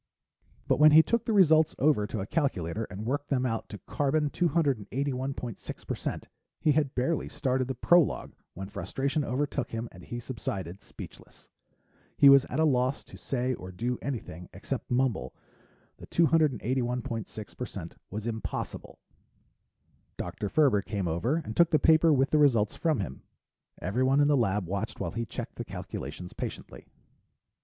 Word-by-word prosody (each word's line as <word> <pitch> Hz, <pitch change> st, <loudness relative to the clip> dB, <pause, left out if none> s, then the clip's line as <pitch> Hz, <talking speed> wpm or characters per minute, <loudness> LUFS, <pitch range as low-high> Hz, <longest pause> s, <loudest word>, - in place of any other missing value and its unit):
But -, -, +2 dB
when 150 Hz, 0 st, +8 dB
he 160 Hz, +1 st, +9 dB
took 235 Hz, +4 st, 0 dB
the -, -, 0 dB
results 160 Hz, -6 st, +5 dB
over 135 Hz, -7 st, +3 dB
to 105 Hz, -, -4 dB
a -, -, -3 dB
calculator 110 Hz, -, -1 dB
and 105 Hz, +2 st, -7 dB
worked 145 Hz, +4 st, -2 dB
them 130 Hz, -2 st, +1 dB
out 115 Hz, -2 st, -2 dB
to 105 Hz, -, -7 dB
carbon 145 Hz, -, 0 dB
281.6% 135 Hz, -, -2 dB, 0.4 s
he 155 Hz, -, +3 dB
had 145 Hz, -2 st, +1 dB
barely 135 Hz, +5 st, 0 dB
started 130 Hz, -1 st, -1 dB
the 130 Hz, -, -3 dB
prologue 175 Hz, +6 st, +3 dB, 0.2 s
when 95 Hz, +2 st, -6 dB
frustration 140 Hz, +8 st, -2 dB
overtook 140 Hz, +1 st, -2 dB
him 115 Hz, +1 st, -4 dB
and 90 Hz, -, -13 dB
he 120 Hz, -, -6 dB
subsided, 100 Hz, -7 st, -5 dB
speechless. -, -, -12 dB, 0.7 s
He 140 Hz, -, +8 dB
was 140 Hz, 0 st, +7 dB
at 130 Hz, -, -3 dB
a 160 Hz, -, +4 dB
loss 130 Hz, -2 st, +1 dB
to -, -, -14 dB
say 130 Hz, -1 st, -2 dB
or 95 Hz, -6 st, -8 dB
do 120 Hz, +7 st, -2 dB
anything 110 Hz, -, -5 dB
except -, -, -5 dB
mumble 120 Hz, -, 0 dB, 0.6 s
that -, -, -12 dB
281.6% 125 Hz, -, -1 dB
was 105 Hz, +2 st, -5 dB
impossible. 115 Hz, -1 st, -5 dB, 1.2 s
Dr. 105 Hz, -, -4 dB
Ferber 135 Hz, -8 st, +4 dB
came 100 Hz, -2 st, -3 dB
over 85 Hz, -, 0 dB
and 110 Hz, -, -6 dB
took 170 Hz, -1 st, +5 dB
the 155 Hz, -, +4 dB
paper 160 Hz, +1 st, +5 dB
with 135 Hz, -1 st, +3 dB
the 155 Hz, -, +4 dB
results 120 Hz, -8 st, +3 dB
from 155 Hz, -9 st, +1 dB
him. 75 Hz, -8 st, -6 dB, 0.6 s
Everyone 130 Hz, -, +1 dB
in 145 Hz, -, +5 dB
the 145 Hz, -, +5 dB
lab 105 Hz, -6 st, +1 dB
watched 100 Hz, +5 st, -4 dB
while -, -, -2 dB
he 115 Hz, 0 st, -3 dB
checked -, -, -7 dB
the -, -, -3 dB
calculations 80 Hz, +6 st, -7 dB
patiently. -, -, -7 dB
130 Hz, 155 wpm, -29 LUFS, 105-145 Hz, 1.2 s, he